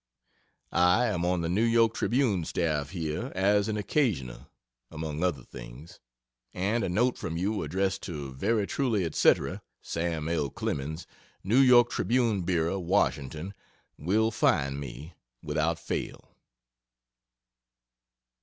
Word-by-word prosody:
I 90 +6 +4
am 90 -5 -1
on 90 -1 +1
the 85 - -1
N. 115 +7 +2
Y. 115 -1 +6
Tribune 115 -8 +1
staff 75 -4 -1
here 85 - -4
as 100 +2 +3
an 110 -1 -1
"occasional,", 100 - -1 0.4
among 80 0 -4
other 80 -9 0
things, 65 +9 -11 0.6
and 105 +6 0
a - - -1
note 120 +8 +1
from 80 - -4
you 100 +4 -1
addressed 95 +1 -1
to 70 -5 -6
Very 105 - 0
truly 110 -7 0
&c. - - +5 0.5
SAM 80 -2 -2
L. 80 -4 0
CLEMENS 75 +6 -4 0.4
New 110 +7 +3
York 125 -2 +6
Tribune 115 -5 +1
Bureau, 85 +1 0
Washington, 80 +1 -1 0.4
will 110 +8 +1
find 70 -9 +1
me, 70 +4 -8 0.3
without 80 +2 0
fail. 85 - -5
90 Hz, 125 wpm, -28 LUFS, 80-105 Hz, 0.6 s, Y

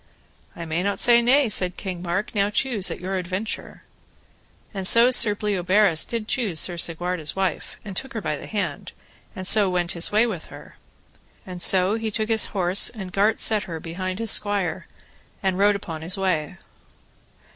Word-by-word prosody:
I 170 - -7
may 160 +2 -2
not 200 +2 -1
say 235 -1 +4
nay, 265 +3 +3
said 185 -4 +1
King 185 -3 -6
Mark; 180 +4 -3
now 200 -1 +1
choose 215 -3 +1
at - - -6
your 190 +2 -3
adventure. 185 +4 -5 0.9
And 190 -2 -2
so 235 +4 +6
Sir 210 -4 +5
Bleoberis 195 -3 +1
did 230 -2 -5
choose 215 -12 0
Sir 175 - +2
Segwarides' 170 -1 -1
wife, 190 -4 -3
and 200 -2 -7
took 265 +8 -5
her - - -1
by 155 -4 -2
the - - -10
hand, 185 -9 -4 0.4
and 185 - -6
so 205 0 +6
went 175 -1 -1
his 170 -1 +2
way 215 +3 +3
with 190 -9 -5
her; - - -13 0.7
and 180 -1 -8
so 185 +2 +2
he 225 0 -2
took 215 +1 -3
his 225 -1 +3
horse 185 0 +1
and 195 -6 -9
gart 210 +2 +2
set 215 -3 +2
her 165 -2 -6
behind 185 +3 -5
his 225 -1 -1
squire, 200 -5 -1 0.6
and 190 -1 0
rode 205 +1 +4
upon 165 -5 -7
his 175 +5 -2
way. 180 -6 -2
190 Hz, 180 wpm, -23 LUFS, 175-215 Hz, 0.9 s, so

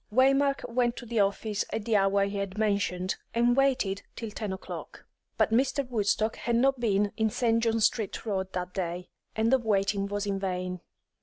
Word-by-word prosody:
Waymark 275 +3 +3
went 240 0 +1
to 245 - -8
the 230 -1 -1
office 200 +1 0
at 215 - -3
the 225 - +1
hour 195 0 +3
he 200 0 -4
had 200 0 -4
mentioned, 200 -3 0 0.2
and 240 +1 +3
waited 255 -8 +1
till 225 -2 -5
ten 210 -1 -4
o'clock. 190 - -8 0.3
But - - +2
Mr. 270 +3 +1
Woodstock 220 -1 0
had 235 - -1
not 265 +2 +3
been 205 -3 +1
in 220 -1 +2
St. 230 +1 +1
John 225 -1 +1
Street 220 0 0
Road 190 -3 -2
that 180 0 -4
day, 180 -1 -3 0.3
and 225 +2 +2
the 265 - +5
waiting 200 -3 +1
was 205 0 -2
in 200 -1 -1
vain. 180 -2 -3
210 Hz, 185 wpm, -28 LUFS, 195-235 Hz, 0.3 s, the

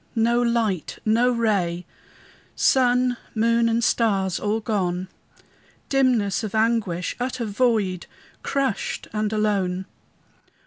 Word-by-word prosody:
no 235 +1 +2
light, 230 -8 0
no 230 +3 +3
ray! 200 -8 0 0.7
Sun, 250 -1 +3 0.2
moon, 230 +1 +2
and 230 +1 +1
stars, 195 -6 +1
all 210 +1 -1
gone! 185 -5 -2 0.8
Dimness 245 -8 +2
of 215 -1 -4
anguish! 220 -6 0
utter 250 -1 -2
void! 210 -4 0 0.3
Crushed, 275 -6 -2
and 215 0 -1
alone! 195 -4 0
220 Hz, 100 wpm, -23 LUFS, 195-235 Hz, 0.8 s, no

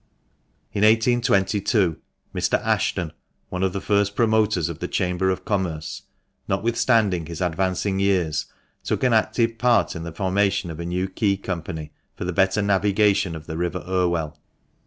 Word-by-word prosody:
In 100 - -1
1822 105 -4 +3 0.4
Mr. - - +1
Ashton 85 -4 0 0.4
(one 90 - -4
of 95 -1 +2
the 100 - -3
first 100 0 +1
promoters 110 -6 +2
of - - -6
the - - -3
Chamber 90 +1 0
of 95 - -2
Commerce), 90 -7 -2 0.5
notwithstanding 110 -7 +1
his 85 -2 -7
advancing 95 +2 0
years, 90 -6 +1 0.4
took - - -2
an 125 -2 +3
active 115 +1 +1
part 120 -3 +3
in 80 - -5
the 85 0 -6
formation 95 +1 0
of 80 - -8
a 85 - -4
New 90 +2 -1
Quay 100 +1 0
Company, 85 -5 -5 0.2
for - - -5
the 90 - -2
better 95 +4 +2
navigation 100 -2 +2
of 80 -1 -9
the 80 0 -5
river 90 0 -2
Irwell. 85 -4 0
95 Hz, 155 wpm, -23 LUFS, 85-105 Hz, 0.5 s, 1822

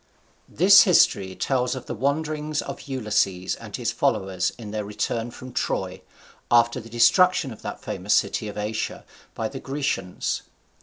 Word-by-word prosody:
This 195 +5 +7
history 100 - +3
tells 125 +1 0
of 130 - -7
the - - -5
wanderings 150 +4 -1
of - - -7
Ulysses 105 -8 0
and - - -8
his - - -1
followers 95 -1 0
in 110 -4 -8
their 105 0 -3
return 105 +3 -3
from 130 +1 -11
Troy, - - -2 0.5
after 120 +1 +4
the 115 -1 -11
destruction 130 +7 +4
of 110 - -15
that - - -7
famous - - 0
city 110 - 0
of 105 - -7
Asia 105 +1 -3 0.3
by 110 - -2
the 135 +3 -7
Grecians. 135 -11 -2
120 Hz, 155 wpm, -24 LUFS, 105-140 Hz, 0.5 s, This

